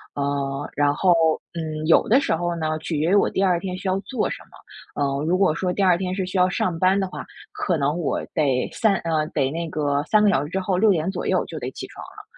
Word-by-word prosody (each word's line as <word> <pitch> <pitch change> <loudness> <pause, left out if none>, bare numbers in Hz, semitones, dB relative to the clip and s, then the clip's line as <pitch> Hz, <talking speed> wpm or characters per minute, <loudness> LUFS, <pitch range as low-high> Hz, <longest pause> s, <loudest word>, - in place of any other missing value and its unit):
呃， 140 0 -2
然 145 0 +3
后， 180 +1 +4 0.4
嗯， 155 -2 -4
有 165 - +4
的 255 +5 +6
时 280 - 0
候 175 +1 -2
呢 155 -1 -2
取 160 0 -4
决 165 +4 +1
于 - - +5
我 - - +4
第 195 - -1
二 180 -3 +2
天 185 -1 -5
需 190 - -6
要 190 +1 +1
做 255 +5 -2
什 - - -4
么， - - -14
呃， 140 +1 -1
如 180 +3 +2
果 185 -6 +3
说 180 +1 -1
第 195 - -1
二 180 -2 +5
天 185 0 -3
是 190 - -2
需 185 0 -2
要 180 +1 +4
上 180 -2 -1
班 190 +2 +3
的 190 - -1
话， - - -7 0.3
可 175 -4 -1
能 145 +2 0
我 155 - -1
得 135 -4 +1
3 215 -3 +2
呃， 160 -3 -1
得 135 -3 -1
那 165 0 -4
个 145 -2 0
3 210 -1 +3
个 - - +5
小 140 -4 +1
时 145 - -7
之 190 - -2
后 190 0 -1
6 205 +3 +4
点 170 0 0
左 - - -4
右 - - +1
就 - - -7
得 - - -4
起 - - -7
床 - - -11
了。 425 - -13
170 Hz, 270 characters per minute, -23 LUFS, 150-190 Hz, 0.4 s, 的